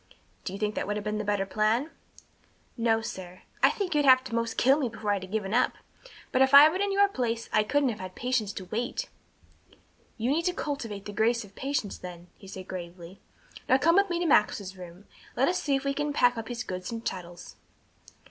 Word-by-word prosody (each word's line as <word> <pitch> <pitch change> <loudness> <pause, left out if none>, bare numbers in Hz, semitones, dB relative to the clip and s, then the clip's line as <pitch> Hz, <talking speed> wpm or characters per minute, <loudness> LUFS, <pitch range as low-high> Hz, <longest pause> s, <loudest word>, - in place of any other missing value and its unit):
"Do - - -3
you - - -5
think 210 0 -1
that - - -3
would 210 0 -1
have 210 - -4
been 210 0 -2
the - - -2
better 205 -1 0
plan?" 215 +9 0 0.8
"No, 230 -2 +1
sir. 185 -4 -8 0.2
I - - +7
think 385 -4 -2
you'd 295 -1 +2
have 260 -2 +8
had 255 - -16
to 240 - -7
'most 230 -1 -1
kill 270 +4 +4
me 260 -5 0
before 215 -2 -3
I'd 200 -2 0
have 190 0 -9
given 210 -2 -2
up, 245 - +3 0.6
but 255 - +2
if 265 +1 +5
I'd 295 +2 +10
been 370 +4 -2
in 405 0 0
your 400 +1 +4
place 235 -10 -2
I 215 - +5
couldn't 270 +5 +1
have 220 - -5
had 185 0 -8
patience 245 -5 -1
to 190 - -7
wait." 225 +6 -3 1.1
"You 235 +3 0
need 330 +3 0
to 360 - +1
cultivate 230 -9 -4
the 205 - -7
grace 230 +3 +1
of 200 -1 -15
patience, 265 -4 -3
then," 175 -1 -10
he 195 - -15
said 190 -1 -9
gravely. 175 0 -8 0.5
"Now 260 - +6
come 325 +5 +3
with 400 -1 +4
me 345 - -1
to 350 - -1
Max's 205 - +2
room, 180 -2 -10
and 200 - -20 0.3
let 265 +3 +2
us 360 - 0
see 280 -2 +1
if 270 - -2
we 275 0 0
can 295 +1 -2
pack 245 -3 +3
up 225 -1 -6
his 245 +1 -4
goods 185 0 -5
and 230 0 -6
chattels." 175 -4 -6
225 Hz, 235 wpm, -28 LUFS, 195-275 Hz, 1.1 s, I'd